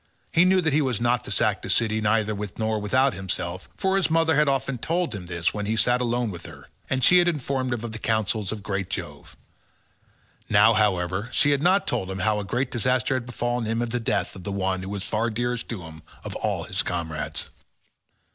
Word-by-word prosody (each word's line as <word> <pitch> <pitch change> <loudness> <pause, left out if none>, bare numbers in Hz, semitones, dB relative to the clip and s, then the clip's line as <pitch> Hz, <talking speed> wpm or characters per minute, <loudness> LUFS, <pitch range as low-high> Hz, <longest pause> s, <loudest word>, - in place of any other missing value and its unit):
He 170 - +5
knew 185 0 +4
that 160 -4 +1
he 155 - +4
was 130 -6 0
not 120 +1 +1
to - - -5
sack 110 -3 +2
the - - -7
city 110 -1 +2
neither 110 0 +1
with 105 -2 -6
nor 110 -1 0
without 130 +6 +2
himself, 95 -1 -4
for 190 -1 +2
his 195 - +2
mother 160 -1 +3
had 150 -1 +4
often 135 -2 -1
told 170 +4 -1
him 95 -4 -7
this 85 -1 -1
when 105 -1 -3
he 110 - +1
had 110 - 0
sat 125 0 +3
alone 120 -2 0
with 85 -2 -8
her, - - -13 0.2
and 130 -1 0
she 180 +6 +7
had 175 - +3
informed 135 -5 -1
him 120 -2 -2
of 120 - -4
the 110 - -6
counsels 110 -3 0
of 110 -2 -6
great 100 -2 -3
Jove. - - -7 1.1
Now, 105 +2 +6
however, 100 0 +1
she 145 - +3
had 140 -1 +2
not 185 +4 +3
told 105 -6 -2
him 95 - -4
how 105 +2 +1
great 125 +7 -1
a - - -26
disaster 125 +2 +1
had 130 -2 -2
befallen 120 -1 -2
him 115 +1 -1
in 120 0 -1
the 120 +1 -1
death 105 -3 -1
of 95 - -10
the 100 - -4
one 95 -1 -1
who 95 - -6
was 100 -1 -4
far 110 +3 -1
dearest 120 +1 -2
to 105 -7 -4
him 80 -1 -11 0.2
of - - -6
all - - -1
his - - -1
comrades. 80 -3 -2
115 Hz, 230 wpm, -25 LUFS, 100-130 Hz, 1.1 s, she